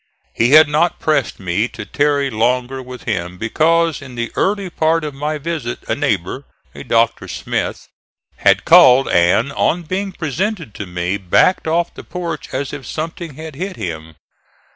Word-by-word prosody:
He 120 +4 +2
had 155 0 +9
not 155 +4 +1
pressed 150 -5 0
me 95 +4 0
to - - -9
tarry 145 -2 +1
longer 125 +4 0
with 125 -1 -10
him 90 -4 -3
because 165 - +1
in 130 -3 -10
the 120 0 -3
early 200 0 0
part 165 -1 +1
of 150 -2 -4
my 150 +3 -3
visit 150 -5 -4
a - - 0
neighbor, 130 - -2 0.3
a - - -9
Dr. 115 -2 +1
Smith, - - -3 0.5
had - - +3
called 130 +2 +7
and, 90 +10 +2
on 175 +5 +1
being 190 +4 -3
presented 170 - -3
to 105 - -7
me, 90 +2 -2
backed 100 - +2
off 170 +2 0
the - - -10
porch 170 -1 -5
as 135 +1 -3
if 145 -2 -6
something 165 -1 -5
had 155 0 -8
hit 185 +7 -5
him. 80 - -6
140 Hz, 165 wpm, -18 LUFS, 115-165 Hz, 0.5 s, had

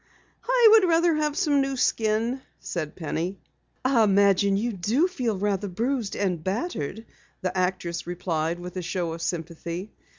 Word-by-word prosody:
"I - - +6
would 440 -3 +7
rather 335 0 +4
have 300 -1 0
some 295 -7 +3
new 270 -1 -1
skin," 230 +3 +1 0.2
said 155 -4 -4
Penny. 170 +3 -3 0.5
"I 255 -4 +4
imagine 200 -1 +4
you 230 +3 -1
do 220 - +1
feel 245 - -2
rather 205 0 -1
bruised 230 +3 -2
and 180 -5 -1
battered," 210 - -3 0.4
the 185 -1 -2
actress 180 -2 -1
replied 170 -2 -2
with 180 +1 -8
a - - -1
show 175 -1 -2
of 165 - -7
sympathy. 170 +3 -4
200 Hz, 155 wpm, -26 LUFS, 175-255 Hz, 0.5 s, would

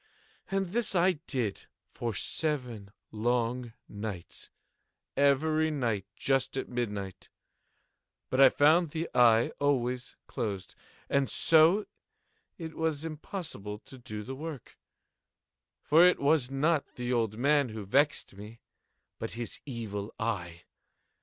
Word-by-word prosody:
And 195 -2 -1
this 225 0 +1
I 180 -2 +3
did 120 -8 -2 0.2
for 115 -3 -4
seven 125 -5 -2 0.2
long 120 +1 -1
nights—every 140 - -2
night 115 -10 -1
just 135 0 0
at 130 - -2
midnight—but 105 +3 -6
I 135 - +10
found 155 +5 +4
the 165 +2 -3
eye 115 -1 +5
always 125 -3 0
closed; 100 -4 -4 0.3
and 140 -1 +1
so 165 +6 +5 0.7
it 165 -2 -7
was 160 -1 -1
impossible 155 - -6
to 130 - -11
do 105 -3 -6
the 130 - -6
work; 150 -1 -8 1.1
for 160 +3 +6
it 180 0 +5
was 140 -2 +3
not 145 +3 0
the 125 0 -2
old 110 -3 0
man 140 +1 +3
who 110 -2 -6
vexed 140 +6 +1
me, 105 +3 -11 0.6
but - - -5
his 120 0 -5
Evil 110 -5 -5
Eye. 90 -7 -3
130 Hz, 115 wpm, -30 LUFS, 110-155 Hz, 1.1 s, I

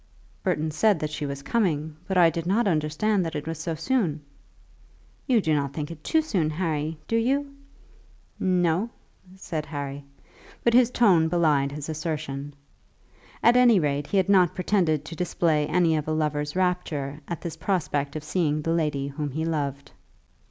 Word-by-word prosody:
"Burton 155 +1 -1
said 205 +5 +3
that 155 -1 -3
she 150 -1 -3
was 140 0 -6
coming, 160 -7 0
but 190 - 0
I 170 -2 +6
did 165 0 -4
not 210 +4 +2
understand 175 +5 +1
that 165 -1 -4
it 150 - -4
was 165 -1 -4
so 160 0 -3
soon." 180 - 0 1.1
"You 250 -4 +4
do 160 -4 +1
not 140 -2 0
think 150 +1 -4
it 155 -2 -10
too 320 0 +2
soon, 185 - 0
Harry; 155 -1 -2
do 230 - 0
you?" 275 +5 +1 0.9
"No," 180 +3 +1 0.5
said 160 -5 -5
Harry, 140 -1 -5 0.6
but 235 - +3
his 245 -1 +6
tone 190 -10 +4
belied 155 -5 +2
his 145 0 -6
assertion. 150 -3 -4 0.9
At 235 - +6
any 245 -5 +6
rate 145 -2 -1
he 200 - 0
had 190 -1 +3
not 185 -4 +4
pretended 175 -6 +1
to 165 - -7
display 160 -3 +1
any 170 -3 +2
of 150 -1 -2
a 155 - 0
lover's 150 -1 -1
rapture 170 -6 -1
at 170 - -5
this 170 -3 -5
prospect 150 -5 -1
of 155 - -4
seeing 155 -2 0
the 165 - 0
lady 150 -4 0
whom 145 +1 -4
he 155 +4 -3
loved. 140 -4 -3
160 Hz, 175 wpm, -25 LUFS, 150-185 Hz, 1.1 s, I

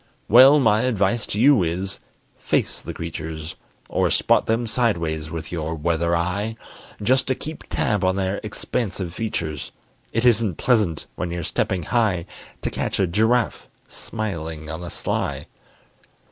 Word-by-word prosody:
Well, 130 +6 +8
my 110 -4 +4
advice 110 -2 +1
to 105 - -2
you 135 -2 +6
is, 90 +3 -2 0.4
Face - - 0
the - - -6
creatures, 80 0 -6 0.3
Or - - +1
spot - - +3
them 115 +2 +1
sideways 85 -10 0
with 80 -1 -6
your 80 -1 -3
weather 85 +2 +1
eye, 95 +6 -1 0.5
Just 130 +5 +3
to 130 - +1
keep 155 +4 -8
tab 105 -3 0
on 95 0 +2
their 95 +1 -1
expansive 100 -4 -3
features; 80 -9 -3 0.4
It 115 +2 0
isn't 110 -7 +3
pleasant 105 -11 +1
when 90 - -2
you're 85 0 -3
stepping 90 +3 -1
high 100 -4 +1 0.4
To - - -1
catch - - -2
a 95 - +4
giraffe 110 +7 +1 0.2
smiling 80 -7 -5
on 80 +2 -5
the 85 - -6
sly. - - -2
95 Hz, 145 wpm, -23 LUFS, 85-115 Hz, 0.5 s, Well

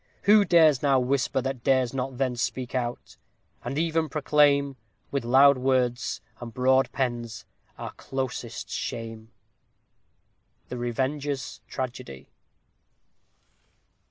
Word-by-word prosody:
Who 205 0 +6
dares 160 -7 +5
now 140 -2 +3
whisper, 130 +1 0
That 130 -3 -4
dares 130 -2 +2
not 130 -1 -3
then 130 -2 0
speak 125 +1 -3
out; 120 -2 -4 0.5
and 125 +4 -4
even 160 -1 0
proclaim, 145 -2 +3 0.4
With 140 -3 -1
loud 135 +3 +6
words, 125 -2 0 0.2
and 120 -1 -7
broad 130 +2 +2
pens, 120 -3 -3 0.3
our - - -6
closest 135 -1 -5
shame? 115 -1 -5 1.4
_The 125 - -4
Revenger's 135 +3 -3
Tragedy. 125 - -6
130 Hz, 105 wpm, -26 LUFS, 125-140 Hz, 1.4 s, Who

